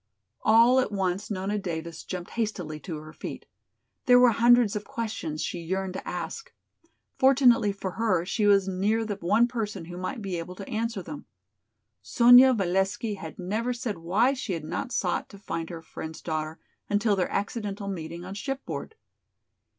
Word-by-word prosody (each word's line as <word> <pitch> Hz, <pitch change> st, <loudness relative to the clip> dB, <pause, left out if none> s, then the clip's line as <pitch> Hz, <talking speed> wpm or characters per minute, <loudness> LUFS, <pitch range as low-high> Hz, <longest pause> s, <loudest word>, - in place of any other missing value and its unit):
All 230 Hz, +4 st, +6 dB
at 255 Hz, -, 0 dB
once 195 Hz, 0 st, -1 dB
Nona 205 Hz, +1 st, -2 dB
Davis 165 Hz, -3 st, -5 dB
jumped 180 Hz, -1 st, -6 dB
hastily 185 Hz, -9 st, -3 dB
to 165 Hz, -1 st, -6 dB
her 155 Hz, +1 st, -10 dB
feet. -, -, -7 dB, 0.6 s
There 245 Hz, -1 st, +8 dB
were 250 Hz, -1 st, +7 dB
hundreds 235 Hz, -1 st, +4 dB
of 210 Hz, -, -2 dB
questions 210 Hz, -10 st, -4 dB
she 175 Hz, -, -3 dB
yearned 190 Hz, +2 st, -3 dB
to 190 Hz, -, -7 dB
ask. 470 Hz, +1 st, -5 dB, 0.7 s
Fortunately 250 Hz, -5 st, +5 dB
for 195 Hz, -1 st, -5 dB
her 185 Hz, -5 st, +1 dB
she 210 Hz, +3 st, +1 dB
was 200 Hz, -1 st, +5 dB
near 205 Hz, +4 st, 0 dB
the 205 Hz, -2 st, -3 dB
one 210 Hz, +6 st, +3 dB
person 210 Hz, -7 st, -4 dB
who 175 Hz, +1 st, -8 dB
might 185 Hz, +7 st, -4 dB
be 190 Hz, -5 st, -3 dB
able 180 Hz, +2 st, -7 dB
to 195 Hz, +1 st, -8 dB
answer 225 Hz, -3 st, -2 dB
them. 290 Hz, -, -9 dB, 0.7 s
Sonya 245 Hz, +2 st, +7 dB
Valesky 195 Hz, +2 st, 0 dB
had 160 Hz, -4 st, -8 dB
never 215 Hz, +7 st, -2 dB
said 235 Hz, -7 st, -4 dB
why 205 Hz, +11 st, +2 dB
she 250 Hz, -7 st, -4 dB
had 165 Hz, -3 st, -4 dB
not 175 Hz, -, -4 dB
sought 180 Hz, -6 st, -1 dB
to 200 Hz, -, -12 dB
find 165 Hz, -4 st, -5 dB
her 165 Hz, -2 st, -7 dB
friend's 160 Hz, 0 st, -8 dB
daughter 155 Hz, -1 st, -3 dB, 0.3 s
until 205 Hz, 0 st, +2 dB
their 185 Hz, -2 st, 0 dB
accidental 205 Hz, -1 st, -3 dB
meeting 170 Hz, -2 st, -5 dB
on 190 Hz, -, -6 dB
shipboard. 270 Hz, -, -5 dB
200 Hz, 170 wpm, -27 LUFS, 175-230 Hz, 0.7 s, There